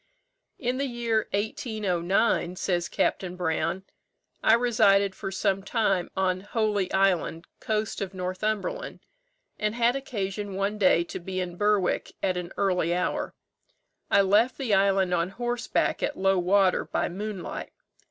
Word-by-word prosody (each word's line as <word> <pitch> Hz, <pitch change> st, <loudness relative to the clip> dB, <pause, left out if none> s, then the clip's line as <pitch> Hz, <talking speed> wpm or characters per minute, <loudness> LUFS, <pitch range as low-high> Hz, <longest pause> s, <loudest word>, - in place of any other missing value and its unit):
"In 250 Hz, +1 st, -2 dB
the 280 Hz, -, 0 dB
year 235 Hz, -3 st, -1 dB
1809," 200 Hz, -3 st, 0 dB
says 175 Hz, -1 st, -1 dB
Capt. 180 Hz, -1 st, -1 dB
Brown, 180 Hz, +2 st, -1 dB, 0.6 s
"I 225 Hz, -, +6 dB
resided 210 Hz, -5 st, +3 dB
for 195 Hz, 0 st, -5 dB
some 195 Hz, 0 st, 0 dB
time 195 Hz, -3 st, 0 dB
on 185 Hz, -1 st, +1 dB
Holy 205 Hz, -2 st, -1 dB
Island, 185 Hz, -4 st, +1 dB
coast 215 Hz, -1 st, -2 dB
of 195 Hz, -2 st, -3 dB
Northumberland, 210 Hz, -, -3 dB, 0.6 s
and 210 Hz, +1 st, -1 dB
had 240 Hz, +1 st, +3 dB
occasion 205 Hz, -6 st, -4 dB
one 200 Hz, +2 st, -1 dB
day 185 Hz, -3 st, +4 dB
to 170 Hz, -, -7 dB
be 185 Hz, +1 st, -4 dB
in 180 Hz, -1 st, -3 dB
Berwick 205 Hz, -1 st, +1 dB
at 185 Hz, -, +1 dB
an 180 Hz, 0 st, -4 dB
early 180 Hz, -3 st, +1 dB
hour. 180 Hz, -, -2 dB, 0.7 s
I -, -, +5 dB
left 210 Hz, +6 st, +3 dB
the 255 Hz, -7 st, -1 dB
island 195 Hz, -1 st, +3 dB
on 170 Hz, 0 st, +1 dB
horseback 240 Hz, +3 st, -1 dB
at 290 Hz, -, -1 dB
low 195 Hz, 0 st, +2 dB
water, 185 Hz, +1 st, +3 dB
by -, -, -1 dB
moonlight. 195 Hz, 0 st, -5 dB
195 Hz, 140 wpm, -27 LUFS, 185-220 Hz, 0.7 s, I